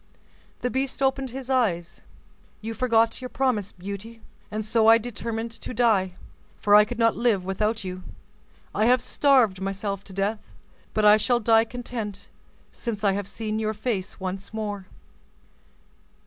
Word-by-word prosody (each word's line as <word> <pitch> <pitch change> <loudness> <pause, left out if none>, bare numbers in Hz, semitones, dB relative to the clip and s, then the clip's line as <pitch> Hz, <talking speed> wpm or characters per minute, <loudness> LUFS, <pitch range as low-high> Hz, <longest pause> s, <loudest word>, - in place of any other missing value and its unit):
The 250 - -1
beast 270 +1 -1
opened 270 0 +1
his 260 +1 -7
eyes. 205 -11 0 0.6
"You 225 +1 -5
forgot 230 -1 +2
your 255 - -5
promise, 245 -8 0
Beauty, 200 +5 -8 0.3
and 215 0 -4
so 225 0 +3
I 225 0 +9
determined 230 0 -4
to 230 - -7
die; 200 -6 +2 0.4
for 205 - +2
I 210 0 +9
could 245 +2 -6
not 230 -1 +3
live 220 -6 +1
without 210 +3 -1
you. 185 0 -5 0.7
I 215 +2 +2
have 250 +1 +5
starved 245 -8 +3
myself 195 0 -3
to - - -10
death, 200 +3 -3 0.4
but 215 - +2
I 210 0 +8
shall 240 +3 +2
die 225 0 +4
content 230 -4 -6 0.4
since 215 -3 -5
I 200 - +4
have 200 0 -3
seen 215 0 -3
your 215 0 -1
face 210 -4 -3
once 190 +1 -5
more." 205 -3 -4
220 Hz, 155 wpm, -25 LUFS, 200-240 Hz, 0.7 s, I